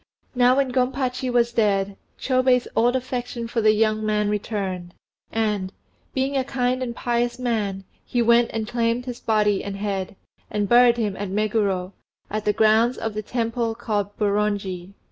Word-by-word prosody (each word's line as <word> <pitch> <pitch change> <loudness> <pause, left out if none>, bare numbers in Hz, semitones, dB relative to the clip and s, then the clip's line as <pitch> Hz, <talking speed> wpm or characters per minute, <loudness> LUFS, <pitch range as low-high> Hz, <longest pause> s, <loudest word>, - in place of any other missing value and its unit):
Now 250 0 +4
when 275 -2 +1
Gompachi 255 0 0
was 235 -1 +2
dead, 200 -3 +1 0.2
Chôbei's 255 -1 +2
old 240 +2 +3
affection 245 -2 -3
for 230 0 -1
the 215 0 +5
young 215 0 +1
man 210 -1 +1
returned, 195 -4 -3 0.4
and, 210 -4 -1 0.4
being 270 +1 0
a 265 - +2
kind 255 -1 -1
and 240 -2 -3
pious 240 0 -1
man, 215 -6 -2 0.2
he 245 - -2
went 235 0 +4
and 220 -1 -3
claimed 235 +1 0
his 245 -2 -6
body 210 -2 +1
and 200 -1 -5
head, 200 0 -3 0.3
and 205 -1 -1
buried 240 +1 +6
him 210 -4 -1
at 205 -1 -4
Meguro, 200 -2 0 0.4
in 215 - 0
the 210 - +2
grounds 220 +3 +3
of 225 -1 -3
the 215 - -3
Temple 230 0 -2
called 210 -4 -3
Boronji. 200 -3 -1
225 Hz, 165 wpm, -23 LUFS, 205-245 Hz, 0.4 s, buried